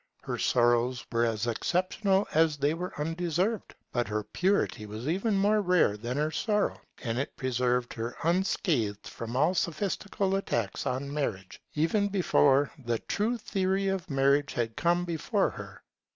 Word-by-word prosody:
Her -, -, -4 dB
sorrows 120 Hz, +1 st, +2 dB
were 115 Hz, 0 st, +2 dB
as 110 Hz, -1 st, -1 dB
exceptional 185 Hz, -, +1 dB
as 160 Hz, -1 st, +3 dB
they 145 Hz, +2 st, +1 dB
were 180 Hz, +3 st, -4 dB
undeserved; 175 Hz, +6 st, -1 dB, 0.2 s
but 120 Hz, -1 st, 0 dB
her 105 Hz, 0 st, -2 dB
purity 180 Hz, -, 0 dB
was 110 Hz, +5 st, -6 dB
even 195 Hz, +6 st, +1 dB
more 210 Hz, +2 st, +3 dB
rare 180 Hz, -, +3 dB
than 120 Hz, +5 st, -4 dB
her 150 Hz, +1 st, 0 dB
sorrow; 210 Hz, +3 st, 0 dB, 0.2 s
and 115 Hz, 0 st, -1 dB
it 140 Hz, -, -4 dB
preserved 125 Hz, -1 st, 0 dB
her 115 Hz, +1 st, -4 dB
unscathed 160 Hz, -, 0 dB
from 115 Hz, +1 st, -6 dB
all 150 Hz, +7 st, +3 dB
sophistical 195 Hz, +3 st, -1 dB
attacks 115 Hz, -, -2 dB
on 140 Hz, +3 st, -2 dB
marriage, 95 Hz, -11 st, -3 dB
even 165 Hz, +7 st, +2 dB
before 145 Hz, -8 st, +3 dB
the 120 Hz, -1 st, 0 dB
true 220 Hz, -, -1 dB
theory 195 Hz, -2 st, 0 dB
of 195 Hz, -3 st, -3 dB
marriage 140 Hz, 0 st, +2 dB
had 115 Hz, -2 st, -2 dB
come 175 Hz, +1 st, +1 dB
before 165 Hz, -3 st, 0 dB
her. -, -, -10 dB
150 Hz, 150 wpm, -29 LUFS, 120-190 Hz, 0.2 s, as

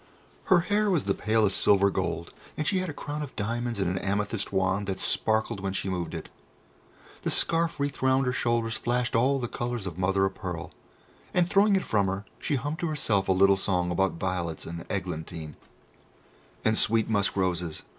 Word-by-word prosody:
Her 180 Hz, -2 st, +5 dB
hair 205 Hz, +3 st, +1 dB
was 175 Hz, -7 st, +2 dB
the 100 Hz, -, +1 dB
palest 110 Hz, -2 st, +1 dB
silver 100 Hz, 0 st, +4 dB
gold, 85 Hz, -3 st, -3 dB, 0.2 s
and 155 Hz, -, -2 dB
she 190 Hz, -, +2 dB
had 185 Hz, -1 st, -3 dB
a -, -, -2 dB
crown 145 Hz, 0 st, -5 dB
of 145 Hz, -3 st, -7 dB
diamonds 115 Hz, +1 st, -2 dB
and 95 Hz, -, +1 dB
an 90 Hz, +1 st, -1 dB
amethyst 105 Hz, +1 st, -1 dB
wand 95 Hz, +1 st, 0 dB
that 95 Hz, -1 st, -3 dB
sparkled 110 Hz, -1 st, +1 dB
when 95 Hz, 0 st, -3 dB
she 95 Hz, -, -2 dB
moved 90 Hz, -2 st, -3 dB
it. -, -, -6 dB, 0.9 s
The -, -, -1 dB
scarf 165 Hz, -2 st, +2 dB
wreathed 140 Hz, -1 st, -2 dB
round 130 Hz, +1 st, +3 dB
her 125 Hz, -, 0 dB
shoulders 115 Hz, -1 st, 0 dB
flashed 120 Hz, +1 st, -1 dB
all 130 Hz, +4 st, +3 dB
the 125 Hz, -2 st, -2 dB
colours 120 Hz, -3 st, -3 dB
of 90 Hz, -2 st, -6 dB
mother 95 Hz, +1 st, +2 dB
of 95 Hz, -, -2 dB
pearl, 90 Hz, -4 st, -6 dB, 0.6 s
and 175 Hz, -2 st, +4 dB
throwing 200 Hz, +2 st, +4 dB
it 190 Hz, -, 0 dB
from 100 Hz, -3 st, +1 dB
her 95 Hz, +2 st, -3 dB
she 145 Hz, -, -1 dB
hummed 145 Hz, +5 st, -3 dB
to 170 Hz, -, -1 dB
herself 110 Hz, -11 st, +1 dB
a -, -, +5 dB
little 95 Hz, +1 st, +5 dB
song 90 Hz, -2 st, 0 dB
about 95 Hz, +2 st, +1 dB
violets 85 Hz, -3 st, -3 dB
and 85 Hz, +1 st, -7 dB
eglantine, 80 Hz, -4 st, -5 dB, 1.1 s
and 110 Hz, 0 st, +4 dB
sweet 115 Hz, 0 st, +4 dB
musk 100 Hz, -3 st, +1 dB
roses. 90 Hz, -4 st, -1 dB
105 Hz, 195 wpm, -27 LUFS, 95-130 Hz, 1.1 s, Her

